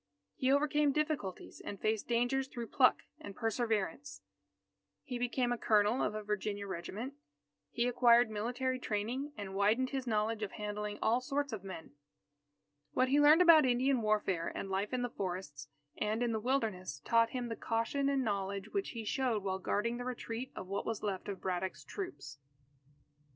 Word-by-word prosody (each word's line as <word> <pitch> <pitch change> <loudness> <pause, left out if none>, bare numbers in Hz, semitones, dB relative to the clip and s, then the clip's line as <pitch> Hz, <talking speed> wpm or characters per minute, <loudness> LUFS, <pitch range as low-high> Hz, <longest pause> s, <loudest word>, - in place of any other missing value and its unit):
He 260 0 +1
overcame 295 +1 +3
difficulties 300 - -2
and 200 - -6
faced 215 -1 0
dangers 245 +3 +1
through 235 -3 -6
pluck 255 -3 +4 0.2
and 200 -1 -9
perseverance. 210 - -2 0.8
He 245 - -5
became 245 0 0
a 245 - -1
Colonel 210 +3 +3
of 210 - 0
a 215 - -4
Virginia 205 -1 -2
regiment. 200 +8 -5 0.6
He 240 +1 0
acquired 240 -1 +5
military 250 +4 -1
training 245 +6 -2
and 200 -2 -6
widened 215 +6 +2
his 265 -2 -3
knowledge 215 0 0
of 210 - -3
handling 210 0 -4
all 235 +3 +3
sorts 280 0 -2
of 205 -4 -5
men. 185 -4 -8 1.0
What 255 0 +2
he 285 +2 +4
learned 305 +4 +7
about 330 -3 +8
Indian 255 0 +2
warfare 205 -6 +1
and 195 - -4
life 195 +2 -1
in 250 -1 -1
the 245 - -1
forests 175 -8 -5 0.3
and 215 +3 0
in 240 - +1
the 220 - 0
Wilderness, 215 - -1
taught 230 0 +4
him 245 -1 -3
the 225 - -3
caution 230 +6 0
and 275 -1 +1
knowledge 200 -3 -2
which 395 -1 -2
he 225 - -4
showed 240 -3 0
while 190 -1 -1
guarding 230 +5 -1
the 245 - -4
retreat 250 0 -5
of - - -6
what 200 +2 -3
was 225 -2 -3
left 195 -3 -3
of 195 -2 -5
Braddock's 185 0 -3
troops. 360 - -7
225 Hz, 170 wpm, -34 LUFS, 200-255 Hz, 1.0 s, about